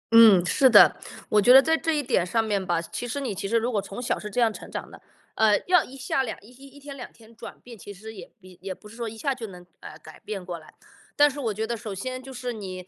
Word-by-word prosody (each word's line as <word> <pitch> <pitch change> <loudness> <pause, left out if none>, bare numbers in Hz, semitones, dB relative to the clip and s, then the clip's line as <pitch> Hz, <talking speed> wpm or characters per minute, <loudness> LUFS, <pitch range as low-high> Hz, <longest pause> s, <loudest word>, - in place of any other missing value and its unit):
嗯， 215 -6 +8
是 260 +8 +4
的。 - - +7 0.3
我 210 - +3
觉 245 - +5
得 265 - +10
在 320 +4 +2
这 320 -1 -1
一 295 - -1
点 240 -9 +1
上 225 +6 0
面 205 -3 -1
吧， 175 -3 0
其 170 +8 -6
实 245 +4 -4
你 265 -6 -3
其 195 - -5
实 230 +3 +1
如 235 +2 -1
果 205 -4 0
从 200 +3 -9
小 245 - -2
是 210 - -7
这 210 - -3
样 230 -2 +3
成 - - -11
长 - - -6
的， - - -14 0.3
呃， 215 -2 +3
要 360 -3 +4
一 270 - -12
下 265 0 -1
两 245 -4 -5
一 215 - -18
一 270 +2 -15
一 280 +1 -16
天 280 0 -10
两 255 - -9
天 230 0 -20
转 - - -11
变， 245 -1 -12
其 205 -1 -11
实 215 +3 -10
也 220 +5 -12
也 185 -1 -15
也 190 -1 -6
不 210 - -16
是 215 - -14
说 235 -1 -4
一 225 - -11
下 275 +3 -1
就 240 -3 -7
能 180 -2 -13
把 - - -10
它 155 - -12
改 155 0 -15
变 195 -4 -7
过 175 -2 -6
来。 155 - -18 0.4
但 290 0 +5
是 290 - -8
我 235 -6 -1
觉 215 +2 -3
得 235 +1 -3
首 215 -3 -7
先 255 +6 -5
就 265 +1 -11
是 250 -1 -5
你， 185 -4 -8
225 Hz, 320 characters per minute, -25 LUFS, 195-255 Hz, 0.4 s, 得